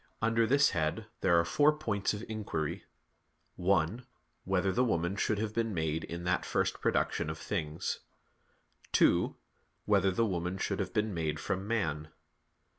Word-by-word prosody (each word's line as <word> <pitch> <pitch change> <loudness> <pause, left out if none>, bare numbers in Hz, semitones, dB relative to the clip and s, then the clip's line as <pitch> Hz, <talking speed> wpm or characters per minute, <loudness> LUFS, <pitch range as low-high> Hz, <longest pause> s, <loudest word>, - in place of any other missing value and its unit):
Under 115 +1 +2
this 140 +3 +4
head 80 +6 -1
there 85 -2 +4
are 85 - +2
four 145 - +4
points 105 -10 0
of 105 +1 -5
inquiry: 100 -9 -3 0.7
(1) 95 +6 +1 0.4
Whether 95 0 +1
the 125 +7 +2
woman 85 -5 0
should 105 +1 0
have 105 0 -2
been 115 -3 -1
made 80 0 -1
in 85 +1 -6
that 90 0 +1
first - - -1
production - - +1
of 80 - -4
things? 80 -3 -3 0.9
(2) - - +4 0.5
Whether 100 -2 +4
the 105 +5 +1
woman 90 -2 -2
should 100 +1 -2
have 95 - -2
been 105 -1 0
made 80 -3 -2
from 95 +3 -3
man? 80 -9 -1
95 Hz, 155 wpm, -31 LUFS, 85-110 Hz, 0.9 s, this